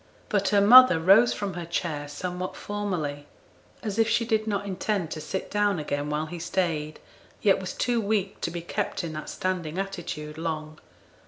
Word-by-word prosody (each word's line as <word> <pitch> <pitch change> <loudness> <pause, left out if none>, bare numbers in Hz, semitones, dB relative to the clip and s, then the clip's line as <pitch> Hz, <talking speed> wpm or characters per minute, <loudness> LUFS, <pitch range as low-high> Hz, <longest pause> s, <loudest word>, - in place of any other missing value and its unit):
But 200 -2 +1
her 205 -1 +4
mother 240 -4 +9
rose 195 +8 +6
from 200 -2 -3
her 175 0 -5
chair 155 -4 -2
somewhat 180 +4 -5
formally, 170 -9 -4 0.6
as 215 -1 -3
if 225 0 +4
she 230 +1 +2
did 220 -1 0
not 205 -1 -1
intend 195 -3 -2
to 155 - -5
sit 190 +5 -5
down 205 -2 +2
again 145 -1 -3
while 150 +1 -1
he 170 +2 -7
stayed, 165 -3 -2 0.4
yet 200 -2 +4
was 185 -1 -5
too 240 -2 0
weak 205 -2 -1
to - - -1
be 170 0 -5
kept 170 - -3
in 165 -2 -4
that 155 0 -6
standing 180 -3 -3
attitude 170 -6 -5
long. 155 -2 -4
180 Hz, 180 wpm, -26 LUFS, 155-205 Hz, 0.6 s, mother